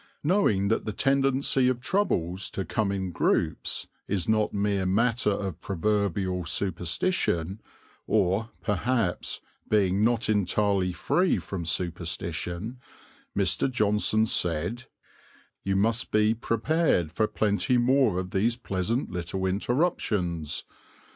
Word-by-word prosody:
Knowing 145 - +2
that 115 - +1
the 110 - -2
tendency 135 +1 +2
of 125 -1 +1
troubles 100 - -1
to 95 - -4
come 105 -3 0
in 95 -2 -2
groups 85 -1 0 0.2
is 95 -3 -1
not 110 -1 +2
mere 100 -1 0
matter 115 +5 +2
of 95 -4 -3
proverbial 100 -1 -1
superstition, 90 - -1 0.5
or, 95 +5 +1
perhaps, 110 -2 -1 0.3
being 100 -1 +2
not 115 0 +2
entirely 100 -2 +1
free 180 - +1
from 90 -4 -5
superstition, 85 +5 -3 0.6
Mr. 95 +5 +1
Johnson 110 -2 +2
said, 90 +5 0 0.8
"You 95 0 0
must 115 +5 +1
be 110 +1 +3
prepared 115 - +1
for 110 +5 +1
plenty 110 +5 +1
more 125 -4 +3
of 90 0 -3
these 115 +5 +1
pleasant 115 +1 -2
little 90 +2 -3
interruptions. 95 - 0
100 Hz, 115 wpm, -27 LUFS, 90-115 Hz, 0.8 s, be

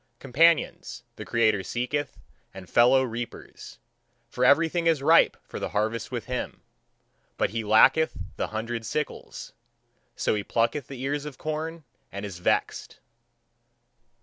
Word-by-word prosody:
Companions, 155 +5 +1
the - - -8
creator 110 -4 +2
seeketh, 125 +7 -3 0.4
and 95 -2 -10
fellow 125 +5 +4
reapers: 120 -1 -7 0.5
for 125 - -2
everything 165 +5 +3
is 160 -4 +2
ripe 165 +3 +5
for - - -8
the - - -3
harvest 110 +3 -2
with 120 -3 -4
him. 125 0 -5 0.7
But - - 0
he 115 0 -3
lacketh 110 +9 +4 0.2
the - - -2
hundred 115 +1 -4
sickles: 150 +6 -5 0.6
so - - 0
he 105 -1 -2
plucketh 115 +5 -1
the 130 -2 -8
ears 145 +1 -2
of 145 -4 -8
corn 155 +2 -4 0.3
and 100 +1 -6
is 95 -4 -8
vexed. - - -1
125 Hz, 135 wpm, -26 LUFS, 110-150 Hz, 0.7 s, ripe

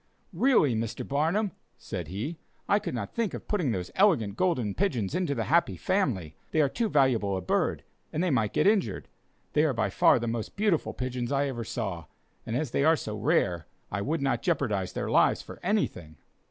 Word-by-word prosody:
"Really, 190 - +4
Mr. 115 0 -3
Barnum," 165 +9 +1 0.3
said 90 -6 -6
he, 115 - -5 0.3
"I 205 - +4
could 125 - -4
not 105 -4 -4
think 225 -6 -1
of - - -9
putting 180 -10 0
those 90 -4 -3
elegant 150 - +3
golden 125 - 0
pigeons 130 - -1
into 175 -5 0
the 115 - -1
Happy 140 - +2
Family, 95 - 0 0.2
they 155 - 0
are 150 - +5
too 230 - -1
valuable 120 - +2
a - - -3
bird, 90 - 0 0.3
and 160 - -1
they 180 - +1
might 110 -5 +1
get - - +1
injured; 195 - +1 0.5
they 150 - +4
are 155 -4 +2
by 100 -5 0
far - - +5
the 120 - -2
most 115 -1 -3
beautiful 205 -6 +1
pigeons 125 -1 -3
I 140 0 +2
ever 120 -3 -4
saw; 95 -8 -4 0.4
and 115 - -2
as 145 -1 -1
they 140 - +1
are 160 +2 +5
so 105 -6 -5
rare, 90 -5 +1 0.2
I 100 - -2
would 150 +6 -1
not 125 -4 +1
jeopardize 105 - 0
their - - -3
lives - - +3
for - - -11
anything." 90 - -1
130 Hz, 200 wpm, -28 LUFS, 105-170 Hz, 0.5 s, are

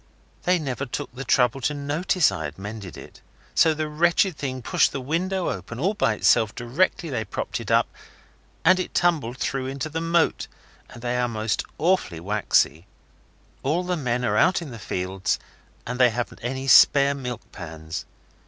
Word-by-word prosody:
They 180 +1 +4
never 140 -3 -3
took 120 - -5
the 130 +2 -6
trouble 125 0 +2
to 150 +4 0
notice 150 - +1
I 90 -5 -4
had 75 +1 -7
mended 100 -2 -7
it. - - -13 0.3
So 160 -1 +4
the 155 0 -2
wretched 170 +4 +2
thing 130 -3 -4
pushed - - +3
the 140 - -4
window 175 +7 -1
open 105 +6 -7
all 190 +8 +1
by 115 - +1
itself 110 0 +3
directly 145 +6 0
they 115 -4 -1
propped 100 - -4
it - - -7
up, - - +4 0.8
and 185 - +6
it 185 - -4
tumbled 150 -9 +1
through 130 0 -2
into 135 +3 -4
the 160 +2 -3
moat, 165 0 +1 0.4
and 120 - -12
they 120 0 -1
are 125 - +1
most 110 -2 -1
awfully 165 - +1
waxy. 95 -3 +1 0.7
All 160 +7 0
the 180 0 -1
men 125 -5 -1
are 105 -1 +1
out 185 +10 +4
in 165 -6 -8
the 115 - -8
fields 95 0 -2 0.5
and 125 +1 -4
they 125 -1 +6
haven't 120 +1 -4
any 130 +2 -3
spare 140 +1 +7
milk 125 -4 -6
pans. 80 -2 -7
130 Hz, 180 wpm, -24 LUFS, 110-160 Hz, 0.8 s, spare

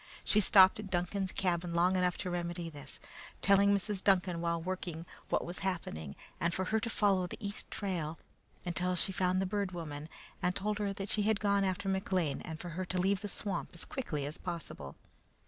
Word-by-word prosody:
She 210 - +3
stopped 190 -1 +7
at 205 -2 -6
Duncan's 190 +1 -1
cabin 175 -2 0
long 180 +2 +4
enough 180 -1 +2
to 180 - -3
remedy 175 -1 -3
this, 145 -2 -8 0.4
telling 200 0 +6
Mrs. 200 -1 +1
Duncan 180 -3 +3
while 170 0 0
working 175 -1 -4 0.2
what - - +1
was 175 +1 -5
happening, 80 - -3 0.2
and 170 0 +1
for 190 - 0
her 220 +4 +1
to 230 - -2
follow 195 -5 +2
the - - -6
east 205 -1 -4
trail 170 -6 -2 0.5
until 180 +1 0
she 185 - +2
found 185 0 +1
the 190 - +1
Bird 200 -1 -1
Woman, 155 -3 -6 0.3
and 180 0 +1
told 210 +2 -1
her 205 -1 0
that 195 0 -4
she 215 - +2
had 210 0 +2
gone 200 -1 +3
after 190 0 -1
McLean 190 -5 0
and 160 -2 -6
for 175 - -6
her 185 +3 -3
to 185 - -2
leave 195 +2 +2
the 205 - -3
swamp 200 0 -1
as 170 - -4
quickly 155 - -3
as 150 +2 -5
possible. 170 - -6
185 Hz, 200 wpm, -33 LUFS, 170-200 Hz, 0.5 s, stopped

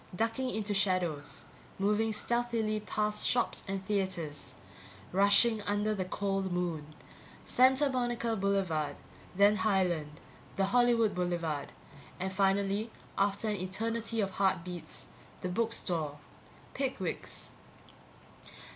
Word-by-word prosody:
Ducking 225 +6 0
into 210 -3 -1
shadows, 180 -7 0 0.3
moving 210 +3 +2
stealthily 225 -1 0
past 210 0 0
shops 245 -1 +1
and 195 0 -3
theatres, 185 -7 -2 0.6
rushing 200 +4 +5
under 205 +1 0
the 190 -3 -2
cold 195 0 -1
moon. 165 -4 -2 0.5
Santa 265 +3 +5
Monica 240 -3 0
Boulevard, 190 -7 0 0.4
then 205 +2 +5
Highland, 175 -8 +1 0.4
the 195 - +2
Hollywood 230 0 +3
Boulevard, 170 -5 -2 0.5
and 190 +1 -2
finally 200 +2 +1 0.3
after 200 +2 +1
an 210 -1 0
eternity 225 +4 -1
of 195 -1 -1
heartbeats 180 -3 -1 0.4
the 180 - -2
book 225 +5 0
store. 160 -9 -1 0.6
Pickwick's. 270 -1 -3
200 Hz, 105 wpm, -32 LUFS, 180-225 Hz, 0.6 s, rushing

